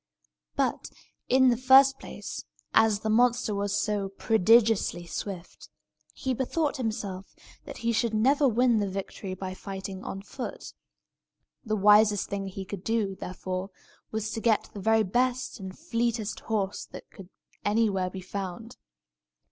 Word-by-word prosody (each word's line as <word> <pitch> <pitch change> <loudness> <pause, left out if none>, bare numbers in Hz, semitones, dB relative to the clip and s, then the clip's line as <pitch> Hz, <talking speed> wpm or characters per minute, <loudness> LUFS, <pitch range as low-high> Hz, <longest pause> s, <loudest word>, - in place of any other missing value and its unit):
But, - - -1 0.4
in 260 0 +6
the 240 - +3
first 265 +2 +6
place, - - -7 0.3
as 220 -2 +4
the 220 - -2
monster 240 -1 +3
was 200 0 0
so 205 -2 -1
prodigiously 220 -3 +3
swift, 180 +1 -7 0.5
he 260 -1 -2
bethought 290 +4 -1
himself 200 -6 -4 0.3
that - - -8
he 235 - +3
should 230 -1 0
never 275 +6 +4
win 240 -1 +3
the 200 -1 -1
victory 190 0 -5
by 185 0 -5
fighting 190 0 -7
on 195 0 -6
foot. 255 +4 -7 0.9
The 215 -3 -1
wisest 210 0 +5
thing 195 -1 -3
he 190 0 -6
could 195 -1 -7
do, 220 -3 0
therefore, 185 +1 -5 0.4
was 220 0 -3
to 225 - -4
get 220 -2 +1
the 205 - -7
very 220 +2 +3
best 250 +5 0
and 190 -1 -8
fleetest 230 -2 -2
horse 205 -3 -2
that - - -11
could 190 -3 -12 0.3
anywhere 205 -3 +1
be 185 0 -7
found. 195 +4 -6
215 Hz, 145 wpm, -28 LUFS, 195-235 Hz, 0.9 s, in